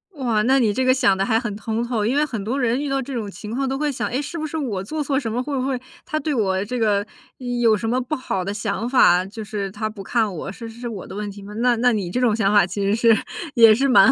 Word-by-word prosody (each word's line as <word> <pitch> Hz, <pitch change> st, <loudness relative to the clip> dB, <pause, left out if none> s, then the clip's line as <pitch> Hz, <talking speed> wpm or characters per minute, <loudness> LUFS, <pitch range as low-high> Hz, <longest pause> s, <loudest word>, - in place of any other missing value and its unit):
哇， 235 Hz, -7 st, 0 dB
那 265 Hz, +3 st, +4 dB
你 225 Hz, -6 st, +2 dB
这 260 Hz, -, 0 dB
个 255 Hz, 0 st, +5 dB
想 200 Hz, -7 st, +3 dB
得 195 Hz, -, 0 dB
还 225 Hz, 0 st, +2 dB
很 230 Hz, -4 st, -4 dB
通 225 Hz, +2 st, -2 dB
透。 235 Hz, -3 st, -1 dB
因 245 Hz, -, +1 dB
为 300 Hz, -, +3 dB
很 225 Hz, -9 st, -5 dB
多 250 Hz, +6 st, -2 dB
人 245 Hz, +2 st, +1 dB
遇 290 Hz, -, -3 dB
到 270 Hz, 0 st, 0 dB
这 270 Hz, +2 st, -6 dB
种 220 Hz, -5 st, -3 dB
情 210 Hz, +3 st, -9 dB
况 265 Hz, +3 st, -1 dB
都 270 Hz, -, -1 dB
会 295 Hz, 0 st, 0 dB
想， 265 Hz, -, -2 dB
哎， 260 Hz, -, -1 dB
是 335 Hz, +3 st, -6 dB
不 310 Hz, -1 st, -3 dB
是 320 Hz, -, -5 dB
我 220 Hz, -11 st, -2 dB
做 300 Hz, +9 st, -3 dB
错 275 Hz, -1 st, 0 dB
什 230 Hz, -5 st, -4 dB
么？ 245 Hz, +2 st, -1 dB
会 285 Hz, 0 st, -3 dB
不 255 Hz, -, -1 dB
会 260 Hz, -2 st, -1 dB, 0.3 s
他 310 Hz, -, -2 dB
对 300 Hz, +1 st, -2 dB
我 195 Hz, -6 st, +1 dB
这 245 Hz, +3 st, -3 dB
个 205 Hz, -2 st, +2 dB, 0.6 s
有 225 Hz, -2 st, +4 dB
什 225 Hz, -, -3 dB
么 250 Hz, +3 st, +1 dB
不 255 Hz, +5 st, -3 dB
好 195 Hz, -9 st, -3 dB
的 200 Hz, +2 st, -3 dB
想 215 Hz, +2 st, -2 dB
法？ 180 Hz, -8 st, +5 dB
就 215 Hz, +3 st, -8 dB
是 205 Hz, -2 st, -4 dB
他 215 Hz, +2 st, -3 dB
不 215 Hz, -2 st, -9 dB
看 220 Hz, +1 st, 0 dB
我， 180 Hz, +3 st, -5 dB
是 230 Hz, +3 st, -8 dB
是 225 Hz, +1 st, -13 dB
是 245 Hz, -, -5 dB
我 205 Hz, -5 st, -7 dB
的 -, -, -9 dB
问 210 Hz, 0 st, -4 dB
题 200 Hz, 0 st, -10 dB
吗？ 205 Hz, +1 st, -9 dB
那 245 Hz, +1 st, +2 dB
那 245 Hz, +2 st, +3 dB
你 200 Hz, -5 st, -2 dB
这 215 Hz, -, -1 dB
种 235 Hz, -4 st, +3 dB
想 200 Hz, -3 st, +2 dB
法 205 Hz, -3 st, +5 dB
其 190 Hz, +3 st, -4 dB
实 200 Hz, +2 st, +2 dB
是 230 Hz, 0 st, +5 dB, 0.4 s
也 225 Hz, -3 st, +7 dB
是 275 Hz, +4 st, +1 dB
蛮 245 Hz, -7 st, +7 dB
230 Hz, 325 characters per minute, -22 LUFS, 205-255 Hz, 0.6 s, 也